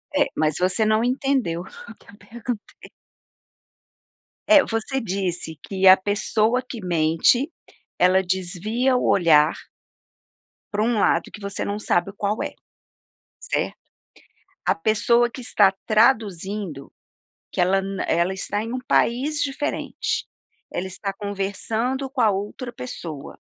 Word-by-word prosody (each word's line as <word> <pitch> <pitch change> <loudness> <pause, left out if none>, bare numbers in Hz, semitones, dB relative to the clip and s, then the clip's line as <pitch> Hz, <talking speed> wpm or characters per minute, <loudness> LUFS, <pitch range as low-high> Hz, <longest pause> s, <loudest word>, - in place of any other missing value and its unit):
É 285 0 +4
mas 155 -1 +1
você 185 +5 +2
não 215 +1 +2
entendeu 250 - 0
o 225 +4 -12
que - - -23
eu 205 - -17
perguntei. 225 +1 -8 1.6
É, 300 -3 +8
você 225 +4 -2
disse 180 -6 -3
que 190 -1 -2
a 185 - +10
pessoa 215 +4 +1
que 240 - -7
mente 175 - +2 0.5
ela 185 +1 +4
desvia 190 +8 0
o 250 - +1
olhar 160 -4 +5 1.2
pra 210 0 0
um 230 -1 +1
lado - - +2
que 210 - -11
você 200 0 -3
não 205 +1 -3
sabe 175 -3 +1
o - - -27
qual 205 +2 -1
é, - - -5 0.9
certo? - - -2 0.9
A - - +3
pessoa 220 +6 +2
que 255 - -9
está 205 -4 +4
traduzindo 205 - +1 0.6
que - - -6
ela 195 +2 +3
na 195 0 -4
ela 170 +3 +1
está 205 +2 -2
em 235 +3 -4
país 285 +5 +1
diferente, 290 +1 -2 0.5
ela 185 +2 -3
está 195 +1 -4
conversando 210 +7 -2
com 260 -1 -2
a 220 -2 +5
outra 205 +6 -4
pessoa. 145 - -8
205 Hz, 135 wpm, -23 LUFS, 185-240 Hz, 1.6 s, a